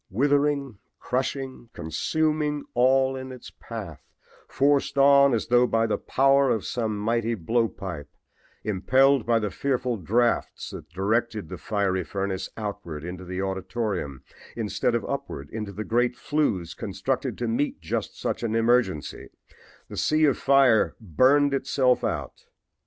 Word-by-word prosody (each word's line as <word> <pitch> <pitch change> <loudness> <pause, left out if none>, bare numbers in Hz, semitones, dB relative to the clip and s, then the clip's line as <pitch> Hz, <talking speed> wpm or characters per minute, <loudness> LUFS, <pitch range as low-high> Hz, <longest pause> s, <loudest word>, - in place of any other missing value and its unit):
Withering, 140 +1 +1 0.2
crushing, 130 -1 -3
consuming 150 - -1
all 130 +2 +3
in 130 0 -6
its 125 -1 -10
path, - - -8 0.5
forced 140 +3 +1
on 140 0 +6
as 110 - -3
though 125 0 +5
by 115 -1 +2
the 110 - -1
power 135 0 +3
of 110 -4 0
some 110 -3 -2
mighty 115 +2 0
blow 115 +5 +1
pipe, 85 -9 -7 0.5
impelled 130 +6 +3
by 120 -1 +4
the 105 -3 -1
fearful 125 -3 -1
drafts 115 +6 0
that - - -9
directed 105 +1 -1
the - - -7
fiery 95 -3 0
furnace 95 +3 -3
outward 100 -8 -5
into 90 +2 -6
the 90 +1 -3
auditorium 95 - -3 0.3
instead - - -1
of - - -1
upward 70 +1 -5
into 105 -2 -5
the 105 +3 -5
great 120 +1 +1
flues 125 - -1
constructed - - -3
to 120 - -2
meet 120 +6 -1
just - - -4
such - - -2
an 115 -2 -1
emergency, 115 -8 +1 0.6
the - - -9
sea 155 0 +3
of 140 - +3
fire 135 -5 +4
burned 130 - +3
itself 130 -2 +2
out. - - -4
120 Hz, 140 wpm, -25 LUFS, 100-135 Hz, 0.6 s, on